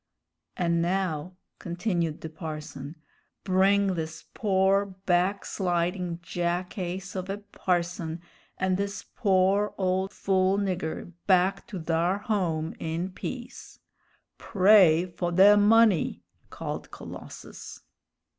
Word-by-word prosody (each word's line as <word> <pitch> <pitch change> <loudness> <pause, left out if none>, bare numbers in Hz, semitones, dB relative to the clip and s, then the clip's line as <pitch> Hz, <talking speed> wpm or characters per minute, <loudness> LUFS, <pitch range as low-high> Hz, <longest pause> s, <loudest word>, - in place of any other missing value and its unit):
"An' 170 -1 +1
now," 180 -1 -1 0.2
continued 175 -3 -2
the 160 - -6
parson, 155 -2 -7 0.5
"bring 195 +1 +3
this 160 -2 -5
pore, 195 -1 +2
back 185 0 0
slidin' 175 -1 -1
jackace 180 +2 -3
of 185 0 -4
a 195 - -2
parson 175 -4 -2 0.4
and 185 0 +1
this 200 0 -3
pore 200 -1 +2
ole 190 0 +1
fool 190 0 +1
nigger 180 -3 -3
back 185 +2 +3
to 205 -6 -6
thar 170 +3 +1
home 180 -8 -1
in 165 +3 -3
peace!" 240 +6 -7 0.6
"Pray 185 -5 +5
fo' 175 0 -3
de 195 +4 +7
money!" 210 -2 +4 0.3
called - - -6
Colossus. - - -10
185 Hz, 105 wpm, -27 LUFS, 170-195 Hz, 0.6 s, de